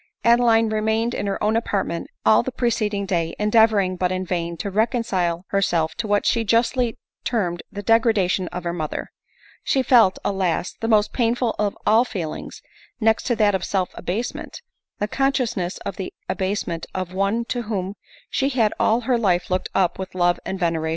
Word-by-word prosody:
Adeline 235 -1 +4
remained 220 +2 0
in 205 - -2
her 200 - -2
own 215 +1 +2
apartment 200 -6 -1 0.2
all 215 - +6
the 260 - -4
preceding 215 -5 -1
day, 170 -4 -1
endeavoring, 210 -3 +3
but 180 0 0
in 185 0 -2
vain, 170 -1 -2
to 195 +4 -4
reconcile 195 -6 0
herself 170 -5 +1
to 230 - -4
what 205 0 +1
she 230 -2 +2
justly 235 +2 +1 0.3
term 205 -8 0
ed 175 - -7
the 205 0 -6
degradation 205 -4 +2
of 180 0 -6
her 170 0 -2
mother. 155 -3 -4 0.5
She 265 - +1
felt, 230 -7 +5
alas! 190 -3 0
the 225 - -1
most 215 -2 +3
painful 240 0 +1
of 205 -1 0
all 220 +3 +5
feelings, 180 -11 -6 0.4
next 220 -1 +2
to 240 - +2
that 210 -2 +3
of 190 -2 -1
self 190 -2 -1
abasement 225 - -4 0.2
— - - -65
the 210 - 0
consciousness 240 -8 0
of - - -4
the 190 - -5 0.2
abasement 185 -3 -2
of 185 -1 -3
one 200 +5 0
to 245 - -1
whom 195 -3 -2 0.4
she 275 - +1
had 230 -6 +2
all 225 +2 +3
her 245 0 +1
life 180 -5 +1
looked 185 0 0
up 180 -1 +1
with 190 -1 -6
love 175 -1 +2
and 190 - -4
veneration 165 -2 0
205 Hz, 185 wpm, -22 LUFS, 185-230 Hz, 0.5 s, all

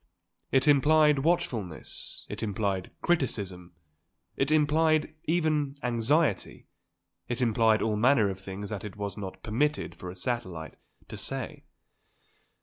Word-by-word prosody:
It 135 +2 +3
implied 150 +1 +5
watchfulness; 120 - -2
it - - -6
implied 100 -3 -1
criticism; 100 - -1 0.6
it 135 - 0
implied, 155 0 +3
even, 155 -4 +1
anxiety; 120 - +1 0.6
it 120 +1 -2
implied 115 -2 +3
all 110 -1 0
manner 120 -1 +4
of 95 - -7
things 95 +2 -7
that 105 - -4
it 105 -3 -7
was 100 -1 -4
not 95 -2 -7
permitted 145 +8 0
for 90 - -8
a 90 - -8
satellite 95 -7 -4 0.3
to - - -8
say. - - -4
115 Hz, 125 wpm, -28 LUFS, 100-150 Hz, 0.6 s, implied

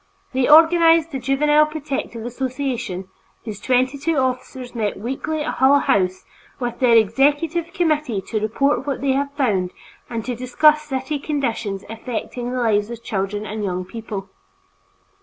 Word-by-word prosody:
They 260 +1 +1
organized 330 +1 +6
the 270 - -3
Juvenile 295 +4 +3
Protective 280 -7 -5
Association, 245 -6 -3 0.4
whose 210 -3 -6
twenty 255 +2 +1
two 325 +3 0
officers 255 -1 -2
meet 215 -4 -2
weekly 270 +7 -3
at - - -2
Hull 270 +2 +6
House 185 -7 +1 0.3
with 240 -2 -3
their 245 -3 +5
executive 290 - +2
committee 305 - 0
to 215 +3 -3
report 270 +6 0
what 280 - -2
they 275 -1 +1
have 280 +1 0
found 200 -10 +1 0.4
and 230 -2 -4
to 250 - -2
discuss 300 +5 +3
city 280 0 -3
conditions 230 -9 -2
affecting 240 +2 -5
the 255 - -3
lives 215 -3 +1
of 235 -1 -8
children 205 0 -3
and 215 0 -4
young 185 -2 -2
people. 210 -2 -6
255 Hz, 150 wpm, -21 LUFS, 220-290 Hz, 0.4 s, organized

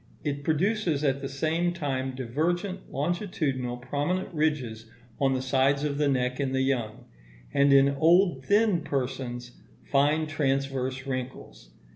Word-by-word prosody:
It 145 -1 -3
produces 165 -1 +1
at 135 -1 +1
the 135 - -4
same 160 +5 0
time 135 -5 -2
divergent, 170 - -2
longitudinal, 145 -6 -2
prominent 145 +10 -2
ridges 130 -8 -1 0.3
on 135 -1 +2
the 130 - -2
sides 135 +2 +2
of 145 -1 -1
the 150 - +3
neck 125 -1 0
in 135 -2 -1
the 130 0 +1
young; 120 -3 -2 0.5
and, 140 0 +4
in 140 0 +6
old 165 +1 +3
thin 205 -1 +3
persons, 125 -3 -3 0.4
fine 150 +3 +3
transverse 135 -3 -1
wrinkles. 130 - -6
140 Hz, 135 wpm, -27 LUFS, 130-155 Hz, 0.5 s, in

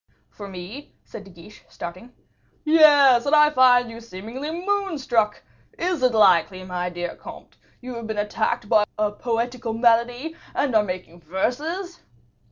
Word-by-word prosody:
"For 205 - -10
me?" 195 +10 -10
said 205 - -11
De - - -14
Guiche, 175 +4 -16
starting. 185 +8 -9 0.5
"Yes; 290 -5 +6
and 295 - +4
I 300 0 +5
find 245 -3 +4
you 230 +1 -10
seemingly 230 +7 -7
moon 385 +1 -2
struck. 225 -6 0 0.3
Is 350 -4 -2
it 255 -2 +2
likely, 185 -2 +3
my 180 -1 -4
dear 175 0 -5
comte, - - -13 0.2
you 255 0 -7
have 235 -1 -7
been 220 -1 -4
attacked 210 0 -2
by 210 0 +4
a 210 -1 0
poetical 235 +1 -3
malady, 240 +6 +1 0.2
and 280 -4 0
are 215 - +6
making 180 -3 -7
verses?" 305 - -3
235 Hz, 155 wpm, -23 LUFS, 205-280 Hz, 0.5 s, Yes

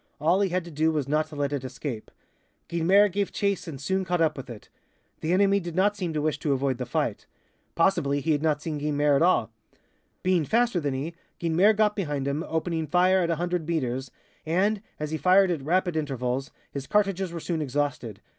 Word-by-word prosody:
All 170 +6 +3
he 195 - +2
had 180 0 -1
to 170 - -9
do 160 +2 +1
was 150 -4 -1
not 155 +2 +1
to 155 - -11
let 145 0 -1
it 140 -2 -2
escape. 130 -3 -6 0.6
Guynemer 185 +5 +4
gave 200 +1 -2
chase 200 -3 -1
and 145 -5 -6
soon 190 +6 -1
caught 180 -1 -1
up 160 -2 +2
with 135 - -8
it. 115 -3 -10 0.5
The 160 - -2
enemy 200 +2 +4
did 170 -3 -6
not 200 +3 +3
seem 180 -5 -3
to 150 - -1
wish 150 -2 0
to 145 -2 0
avoid 135 -1 -1
the 125 - -4
fight. - - -2 0.5
Possibly 165 -5 +2
he 155 +3 0
had 145 -1 +1
not 150 -1 0
seen 155 -3 -3
Guynemer 145 -1 +2
at - - +2
all. 120 -10 +3 0.7
Being 185 -3 +2
faster 235 - +2
than 145 -4 -2
he, 150 +6 -4 0.3
Guynemer 175 +6 +3
got 210 -1 +3
behind 145 -8 -2
him, 145 +3 -1
opening 160 0 -2
fire 180 +4 +4
at 170 -2 0
100 175 0 -1
meters,[A] 130 -5 -2 0.4
and, 195 +5 +2 0.2
as 150 0 -3
he 160 - -2
fired 185 0 +5
at 165 -5 -2
rapid 175 +4 0
intervals, 135 -3 -2 0.2
his 140 -1 -6
cartridges 195 -3 +1
were 170 - -5
soon 165 0 -2
exhausted. 140 -6 -2
160 Hz, 210 wpm, -26 LUFS, 145-185 Hz, 0.7 s, fired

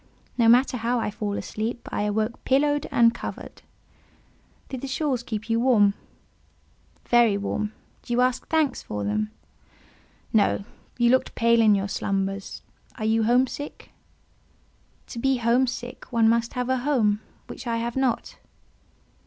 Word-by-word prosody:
No 230 -2 +4
matter 250 +2 +4
how 235 +2 0
I 215 - -2
fell 205 0 -3
asleep; 225 +4 -4
I - - -1
awoke 215 +2 -2
pillowed 290 +2 +2
and 230 -1 +4
covered." - - -8 1.1
"Did 260 -2 -6
the 275 - -4
shawls 265 -2 -1
keep 220 -3 -5
you 230 0 +1
warm?" 225 -5 +4 1.1
"Very 235 -4 +4
warm. 210 +1 -3 0.3
Do - - -10
you 240 +1 +2
ask 255 0 0
thanks 315 -5 +1
for 105 -1 -5
them?" 105 +1 -1 1.0
"No. 210 -2 +2 0.3
You 240 -1 +4
looked 260 - +1
pale 235 0 +4
in 215 -2 +5
your 195 0 -1
slumbers: 195 0 -3 0.3
are 215 - -3
you 220 0 +2
home 245 +3 +4
sick?" 290 +3 -8 1.1
"To 235 - -8
be 270 +2 +2
home 240 +2 +2
sick, 245 0 -6
one 230 -2 +3
must 230 +1 +1
have 250 0 -2
a 260 - +2
home; 240 -6 +1 0.2
which 260 - -9
I 230 -1 0
have 235 +1 -3
not." 265 -3 -1
235 Hz, 155 wpm, -25 LUFS, 215-255 Hz, 1.1 s, in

